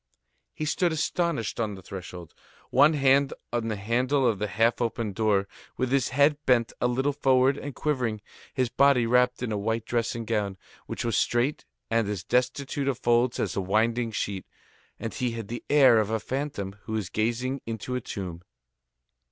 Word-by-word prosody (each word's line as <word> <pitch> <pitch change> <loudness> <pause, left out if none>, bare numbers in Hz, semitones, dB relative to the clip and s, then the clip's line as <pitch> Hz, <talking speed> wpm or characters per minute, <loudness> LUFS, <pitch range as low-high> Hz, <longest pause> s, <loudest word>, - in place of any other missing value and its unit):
He 155 - -3
stood 175 +3 +1
astonished 160 - -1
on 110 -3 -1
the 95 - -12
threshold, 90 -3 -9 0.4
one 145 +5 +6
hand 140 -1 +3 0.2
on 120 -1 -1
the 110 - -1
handle 125 +7 +1
of 110 -5 +2
the 105 - -1
half 115 +5 +1
open 115 -3 -1
door, 100 -2 +1 0.3
with 130 -1 -1
his 135 -3 +2
head 145 +3 +3
bent 120 -3 +3
a 125 - +3
little 135 +4 0
forward 135 -1 +3
and 145 -1 -7
quivering, 125 -8 -1 0.3
his 130 -2 0
body 135 0 +4
wrapped 125 +1 +2
in 120 - -2
a 105 - -1
white 115 +2 -1
dressing 115 -1 -1
gown, 105 -4 -1 0.3
which - - -4
was 115 - 0
straight 120 +5 +1 0.3
and 115 -3 +2
as 100 -4 -3
destitute 135 +3 0
of 135 -3 0
folds 120 +1 +2
as - - -1
a 100 - 0
winding 115 +4 +1
sheet; 100 -3 -3 0.5
and 115 - -4
he 125 -3 -2
had 115 -3 -6
the 120 - -5
air 135 -6 +6
of 110 -1 0
a 110 0 0
phantom 125 -7 -4
who 110 - -3
is 105 -4 -2
gazing 120 +6 -1
into 115 +2 -4
a 125 - -1
tomb. 90 -6 -6
120 Hz, 185 wpm, -27 LUFS, 110-135 Hz, 0.5 s, one